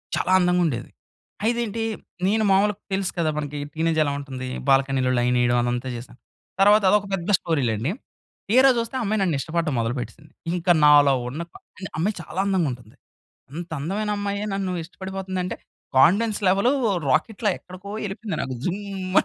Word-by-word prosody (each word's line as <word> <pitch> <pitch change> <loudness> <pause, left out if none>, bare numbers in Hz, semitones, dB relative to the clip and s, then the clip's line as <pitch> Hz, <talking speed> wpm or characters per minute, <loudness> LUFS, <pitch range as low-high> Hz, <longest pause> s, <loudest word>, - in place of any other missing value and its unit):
చాలా 185 - 0
అందంగా 180 0 +2
ఉండేది. 120 -7 -2 0.6
అయితే 235 +1 +1
ఏంటి 225 +1 -3 0.4
నేను 215 +2 +2
మామూలుగ 200 +2 +3 0.2
తెలుసు 190 -1 0
కదా 160 -2 +2
మనకి 145 -1 -4 0.2
టీనేజ్ 160 0 0
ఎలా 145 - -1
ఉంటుంది? 130 -2 -6 0.2
బాల్కనీలో 135 -1 +3
లైన్ 125 +1 +2
ఏయడం 120 0 +2
అదంతా 120 +1 -2
జెస్తం. 120 +1 -10 0.4
తర్వాత 210 +1 +6
అదొక 205 +1 +3
పెద్ద 185 0 -2
స్టోరీ 160 -5 -1
లెండి. 110 +7 -1 0.6
తీరా 260 +4 +6
జూస్తే 230 +3 -3
ఆ - - -2
అమ్మాయి 215 0 0
నన్ను 175 -6 +1
ఇష్టపడటం 165 0 -1
మొదలుపెట్టేసింది. 125 +6 -4 0.2
ఇంక 180 0 -4 0.2
నాలో 145 -1 +7 0.2
ఉన్న 145 +6 -5
కా - - -13 0.2
అన్ 185 - -5
అమ్మాయి 195 +6 0
చాలా 170 +2 -6
అందంగా 190 -5 +1
ఉంటుంది. 120 -3 -11 0.6
అంత 170 +3 -6
అందమైన 205 +8 -2
అమ్మాయే 200 0 -2
నన్ను 195 -1 -2
ఇష్టపడిపోతుంది 190 +2 -6
అంటే 180 - -3 0.4
కాన్ఫిడెన్స్ 205 +10 +4
లెవెలు 200 +7 +3 0.4
రాకెట్‌లా 210 - +1
ఎక్కడికో 185 +2 -11
ఎళ్ళిపోయింది 210 +1 -4
నాకు 130 - -4
జుమ్ 185 +2 -1 0.4
అని... - - -15
180 Hz, 165 wpm, -23 LUFS, 140-200 Hz, 0.6 s, నాలో